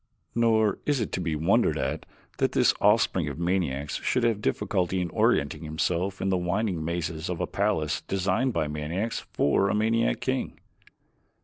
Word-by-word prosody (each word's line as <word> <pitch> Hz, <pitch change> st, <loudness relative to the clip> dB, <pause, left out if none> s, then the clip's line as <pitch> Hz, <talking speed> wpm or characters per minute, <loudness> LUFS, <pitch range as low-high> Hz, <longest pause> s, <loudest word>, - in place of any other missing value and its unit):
Nor 110 Hz, -2 st, +2 dB
is 145 Hz, -2 st, +2 dB
it 110 Hz, -, -2 dB
to 95 Hz, -, -2 dB
be 80 Hz, -3 st, -1 dB
wondered 80 Hz, +2 st, +2 dB
at -, -, -3 dB, 0.3 s
that -, -, +1 dB
this -, -, +4 dB
offspring -, -, +3 dB
of -, -, -5 dB
maniacs 85 Hz, -6 st, -1 dB
should 125 Hz, -, 0 dB
have 115 Hz, -3 st, +1 dB
difficulty 95 Hz, -4 st, 0 dB
in 90 Hz, -2 st, -2 dB
orienting -, -, +1 dB
himself 85 Hz, +5 st, -1 dB
in 95 Hz, -, -1 dB
the 95 Hz, -, +2 dB
winding 90 Hz, -1 st, -1 dB
mazes 80 Hz, 0 st, -3 dB
of 90 Hz, -2 st, -3 dB
a 90 Hz, -, 0 dB
palace 100 Hz, -7 st, 0 dB
designed 95 Hz, +7 st, +1 dB
by 80 Hz, -8 st, -1 dB
maniacs 80 Hz, +9 st, -3 dB
for 95 Hz, +7 st, +2 dB
a -, -, +1 dB
maniac 110 Hz, -, +1 dB
king. -, -, -2 dB
90 Hz, 170 wpm, -27 LUFS, 80-105 Hz, 0.3 s, this